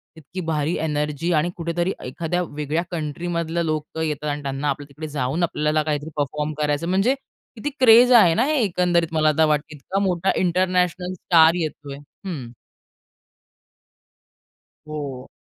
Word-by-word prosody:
इतकी 165 +4 -8
भारी 160 0 -1
एनर्जी 150 +2 -1
आणि 160 +3 +2
कुठेतरी 170 +2 -1
एखाद्या 165 +7 -2
वेगळ्या 150 +1 -2
कंट्रीमधले 170 +1 -2
लोकं 155 +1 -3
येतात 150 -1 -2
आणि 145 0 -3
त्यांना 140 +1 -2
आपल्या 145 +1 -3
तिकडे 155 +3 -7
जाऊन, 145 +3 -1
आपल्याला 155 -1 +1
काहीतरी 150 0 -2
परफॉर्म 150 +2 -2
करायचं 150 +2 0
म्हणजे 195 +8 +3 0.4
किती 260 +7 -3
क्रेझ 245 0 +7
आहे 195 -9 +7
ना 240 +9 +2
हे 305 -2 +1
एकंदरीत, 175 -3 +1
मला 155 -1 +3
आता 155 +1 +3
वाटतं 150 0 -1
इतका 185 +8 -3
मोठा 190 -1 +1
इंटरनॅशनल 180 0 +1
स्टार 165 -2 +5
येतोय. 145 -4 -4 0.3
हं. 145 -11 -5 2.4
हो. 140 -4 -6
160 Hz, 140 wpm, -22 LUFS, 150-180 Hz, 2.4 s, क्रेझ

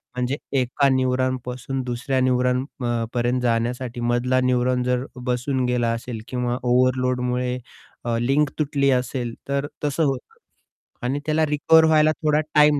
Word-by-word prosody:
म्हणजे 125 +2 -1 0.2
एका 135 +3 +2
न्यूरॉनपासून 130 0 -1
दुसऱ्या 130 +2 -1
न्यूरॉन 125 0 +2 0.2
अ, 120 -1 0
...पर्यंत 120 +1 0
जाण्यासाठी 120 +1 -1
मधला 120 +2 +1
न्यूरॉन 125 0 +1
जर 125 +1 0 0.2
बसून 125 +1 0
गेला 120 -1 +1
असेल 115 -1 -5
किंवा 125 -1 -2
ओव्हरलोडमुळे 125 0 +1 0.5
अ, 115 -1 0
लिंक 140 +3 +2
तुटली 140 -2 +1
असेल, 125 -2 -1
तर 140 +1 -1 0.2
तसं 150 +2 +1
होतं 135 - -2 0.7
आणि 135 +3 0
त्याला 155 0 +2
रिकव्हर 155 +2 +4
व्हायला 155 -1 +4
थोडा 150 0 +3
टाईम 150 -1 +5
125 Hz, 135 wpm, -23 LUFS, 125-140 Hz, 0.7 s, टाईम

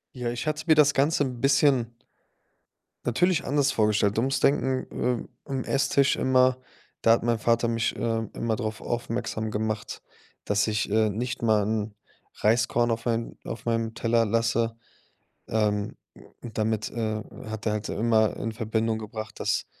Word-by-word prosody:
Ja, 125 -2 -2
ich 120 0 -4
hatte 155 0 -2
mir 160 - +6
das 150 -1 +5
Ganze 145 +3 +2
'n 125 -3 -4
bisschen 135 -4 +3 1.1
natürlich 160 +8 +2
anders 140 -1 +2
vorgestellt. 105 -1 +2
Du - - +3
musst 135 +1 0
denken, 130 -3 0 0.2
äh, - - -21
am 130 -1 -1
Esstisch 140 0 +2
immer, 130 0 +3 0.4
da 115 - +5
hat 115 - +3
mein 120 -1 +1
Vater 115 +1 +2
mich, 115 0 0
ähm, 115 -2 -1
immer 115 -1 -1
drauf 110 -2 -4
aufmerksam 115 -2 -3
gemacht, 110 0 -3 0.4
dass 105 +1 +1
ich, 105 -1 -1
äh, 110 +1 +3
nicht 120 +4 -3
mal 110 -2 +3
'n 105 0 -2 0.4
Reiskorn 120 +2 +2
auf 115 0 -2
meinen 115 -1 -2
auf 115 -1 -7
meinem 115 -1 0
Teller 115 0 +2
lasse. 115 +1 0 0.7
Ähm, 105 -1 0 0.5
damit, 110 -2 -2
äh, 110 -2 -2 0.2
hat 110 -1 -6
er 110 - +2
halt 105 +1 -3
immer 110 0 +2
in 115 - -3
Verbindung 110 0 -1
gebracht, 110 0 -7
dass - - 0
115 Hz, 160 wpm, -26 LUFS, 110-125 Hz, 1.1 s, mir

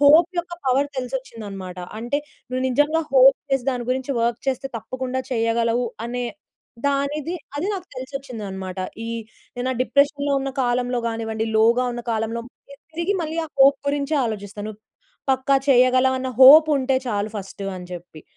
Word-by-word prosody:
Hope 310 +5 +7
యొక్క 345 0 -15
power 265 +2 +3
తెలిసొచ్చిందనమాట. 220 -8 -6 0.2
అంటే. 240 +5 -1 0.3
నువ్వు 255 0 -1
నిజంగా 295 +5 +2
హోప్ 265 0 +7
చేసి 270 -2 +1
దాని 245 -2 -3
గురించి 260 +2 -1
వర్క్ 235 0 0
చేస్తే 270 +1 -1
తప్పకుండా 260 +2 -4
చేయగలవు 230 0 +1 0.2
అనే, 245 +1 -3 0.6
దానిది 285 +4 -1 0.2
అది 310 - -1
నాకు 365 -2 -6
తెలిసొచ్చిందనమాట. 225 -9 -6 0.3
ఈ - - -4 0.5
నేను 245 +1 -2
ఆ - - -4
డిప్రెషన్‌లో 285 +1 +2
ఉన్న 270 0 -2
కాలంలో 245 0 0
గానివ్వండి, 225 -1 -3
లోగా 235 +3 +4
ఉన్న 240 0 -5
కాలంలో 225 +1 -1 0.5
తిరిగి 340 +5 -1
మళ్ళీ 320 0 -4
ఆ - - -18
హోప్ 275 +1 +7
గురించే 285 +1 -1
ఆలోజిస్తాను. 210 -1 -5 0.6
పక్కా 265 +1 +2
చేయగలం 255 0 +5
అన్న 260 0 -3
హోప్ 305 +4 +10
ఉంటే 265 -1 +1
చాలు 210 -1 -1
ఫస్ట్ 195 0 -7
అని 180 -1 -8
జెప్పి. 170 -3 -10
255 Hz, 145 wpm, -22 LUFS, 230-275 Hz, 0.6 s, హోప్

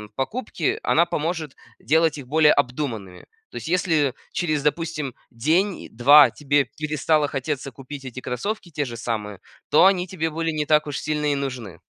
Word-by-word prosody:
покупки, 175 - -2
она 170 - +3
поможет 160 -3 -3 0.2
делать 160 +1 +2
их 135 -3 -9
более 150 +2 +5
обдуманными. 125 -9 -3 0.3
То - - -15
есть - - -6
если 160 -6 +1 0.2
через, 155 -5 -1
допустим, 150 -3 -2 0.2
день-два 145 - +4
тебе 145 +2 +1
перестало 155 0 +1
хотеться 135 0 -4
купить 135 +1 -10
эти 130 0 -7
кроссовки, 180 - -4
те 145 -3 -2
же 120 - -7
самые, 105 -4 -4 0.3
то 155 - +6
они 185 -2 +4
тебе 160 -3 -2
были 165 +1 -2
не 155 -1 -2
так 150 0 +4
уж 145 -2 -4
сильно 150 -1 -1
и 145 - +1
нужны. 125 -9 -5
150 Hz, 160 wpm, -23 LUFS, 130-160 Hz, 0.3 s, то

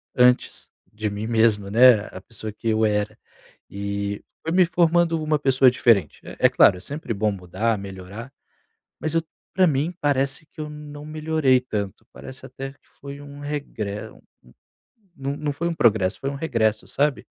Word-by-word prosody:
antes 125 -1 +3 0.2
de 105 0 -3
mim 105 +2 -4
mesmo, 110 -3 +3
né, 115 -2 +6
a - - -8
pessoa 110 0 -7
que 110 +2 -8
eu 110 0 +3
era, 105 -1 0 0.5
e 100 0 -4 0.2
foi 160 - -2
me 180 +1 +5
formando 165 -1 +2
uma 155 -1 +1
pessoa 130 -2 +4
diferente, 115 -6 +2
é - - -9
é - - +6
claro, - - +5
é - - -9
sempre 145 0 -5
bom 105 0 +1
mudar, 100 +4 -1
melhorar, 100 +5 -8 0.7
mas 155 0 -2
eu 165 - +2 0.3
para 190 -1 +5
mim 150 +2 +1
parece 140 +1 0
que - - -13
eu 150 0 -4
não 150 -1 -9
melhorei 155 -4 +2
tanto, 105 -6 -5
parece 130 0 -9
até 135 +1 -7
que 135 - -31
foi 140 0 -8
um 145 0 -11
regre 145 -8 -4 1.2
não 140 +1 -3
não 150 -1 -2
foi 170 +4 -2
um 170 - -2
progresso, 110 - +2
um 140 - -1
regresso, 115 -8 0
sabe? 145 0 0
130 Hz, 170 wpm, -23 LUFS, 105-150 Hz, 1.2 s, né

